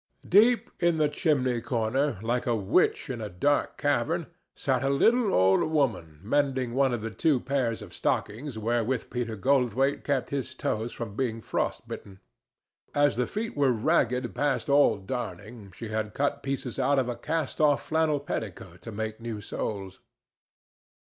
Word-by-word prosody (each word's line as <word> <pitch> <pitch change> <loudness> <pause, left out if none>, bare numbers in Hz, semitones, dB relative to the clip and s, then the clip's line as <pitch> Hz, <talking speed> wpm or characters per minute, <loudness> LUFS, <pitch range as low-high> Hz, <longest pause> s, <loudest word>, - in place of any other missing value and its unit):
Deep 225 +6 +5
in 170 -1 +3
the 155 -1 +3
chimney 135 -5 +1
corner, 120 +2 0
like 120 +2 -1
a 120 - +2
witch 110 - +2
in 125 -4 -4
a 105 - -4
dark 140 +11 0
cavern, 145 +4 0 0.3
sat 130 -2 0
a 135 - +1
little 225 - +3
old 95 +1 +4
woman 100 - 0
mending 130 0 0
one 135 0 +3
of 120 -3 -2
the 115 0 -4
two 145 +3 +2
pairs 125 -5 -1
of 95 - -12
stockings 120 +4 -2
wherewith 120 +2 -1
Peter 120 -3 -2
Goldthwaite 135 +3 +1
kept 140 -4 -1
his 130 -2 -3
toes 115 -1 -2
from 110 -4 -6
being 115 -3 -1
frost - - -2
bitten. 95 -1 -8 0.8
As 145 0 +3
the 125 +1 0
feet 220 +2 -4
were 140 -2 +3
ragged 125 0 +1
past 140 +1 0
all 140 -6 +5
darning, 100 -1 -6
she 110 +4 -8
had 110 -1 -3
cut 145 +1 0
pieces 135 -2 -4
out 140 +2 +3
of 130 -2 +2
a 120 - -2
cast 160 +5 -2
off 145 -2 +3
flannel 160 -2 +1
petticoat 95 - -6
to 115 - -8
make 110 +1 -4
new 115 -2 -4
soles. 100 -2 -5
125 Hz, 165 wpm, -27 LUFS, 110-145 Hz, 0.8 s, Deep